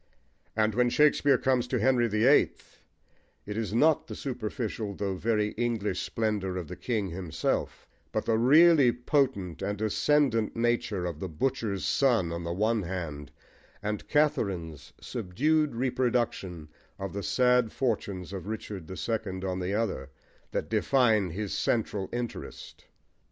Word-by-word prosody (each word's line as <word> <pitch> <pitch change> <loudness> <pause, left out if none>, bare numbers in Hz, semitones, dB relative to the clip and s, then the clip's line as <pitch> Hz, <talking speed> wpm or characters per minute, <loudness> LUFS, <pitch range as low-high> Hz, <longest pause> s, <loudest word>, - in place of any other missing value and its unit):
And 110 0 +2
when 125 +2 +3
Shakespeare 145 0 +4
comes 125 -2 +1
to 125 - 0
Henry 120 +1 +3
the 110 +1 +1
Eighth, 140 +3 +2 0.6
it 105 - -5
is 110 -2 -2
not 150 +7 +3
the - - -6
superficial 110 -4 -4
though 100 -1 -2
very 105 +2 0
English 115 -2 -1
splendour 105 -4 -2
of 90 -4 -5
the - - -7
king 110 -6 -2
himself, 85 -2 -3 0.2
but - - -2
the 115 - +2
really 140 +3 +6
potent 120 - 0
and 100 +1 -2
ascendant 115 +1 +2
nature 115 -5 0
of 85 -3 -4
the 95 - -4
butcher's 105 - -1
son 115 -11 +2
on 85 0 -4
the 85 - -3
one 110 +5 +1
hand, 85 -6 -5 0.5
and 105 0 -3
Katharine's 95 - 0
subdued 150 - 0
reproduction 120 -10 -1 0.3
of 95 -2 -5
the 100 - -3
sad 125 +3 +3
fortunes 100 -7 -2
of 95 0 -6
Richard 105 -5 -6
the 95 - -7
Second 100 -5 -3
on 95 -1 -2
the 95 +2 -2
other, 100 -12 -2 0.4
that - - -3
define 110 -8 +2
his 100 +4 -4
central 105 -4 -1
interest. 120 -1 -6
110 Hz, 145 wpm, -28 LUFS, 95-125 Hz, 0.6 s, really